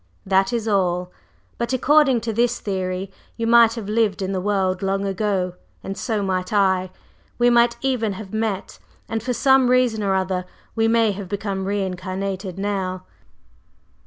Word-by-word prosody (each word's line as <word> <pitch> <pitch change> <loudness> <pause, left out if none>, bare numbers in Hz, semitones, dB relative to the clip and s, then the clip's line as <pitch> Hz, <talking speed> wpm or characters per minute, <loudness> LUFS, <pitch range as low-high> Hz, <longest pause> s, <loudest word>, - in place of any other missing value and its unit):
That 195 +3 +2
is 230 -2 -2
all. 180 -3 0 0.5
But 235 +1 -1
according 270 -1 +4
to 225 0 -3
this 240 +2 +1
theory, 190 -1 -3 0.3
you 230 - -2
might 230 0 +6
have 225 -4 -6
lived 210 -3 +1
in 190 - -2
the 190 -1 -2
world 190 -2 0
long 195 0 -1
ago, 195 -2 -1 0.3
and 195 - -5
so 210 +1 -2
might 185 -1 -2
I: 190 -3 +2 0.5
we 240 0 +4
might 235 0 +4
even 245 -6 0
have 190 0 -9
met; 220 -3 -3 0.3
and 225 0 -2
for 250 +3 -2
some 265 -1 +4
reason 250 -3 +2
or 195 -2 +1
other 185 -1 -1 0.3
we 225 0 +2
may 225 -1 +3
have 195 -2 -7
become 200 -1 -3
re 200 0 -1
incarnated 185 0 -4
now. 190 -2 -2
200 Hz, 165 wpm, -22 LUFS, 190-230 Hz, 0.5 s, might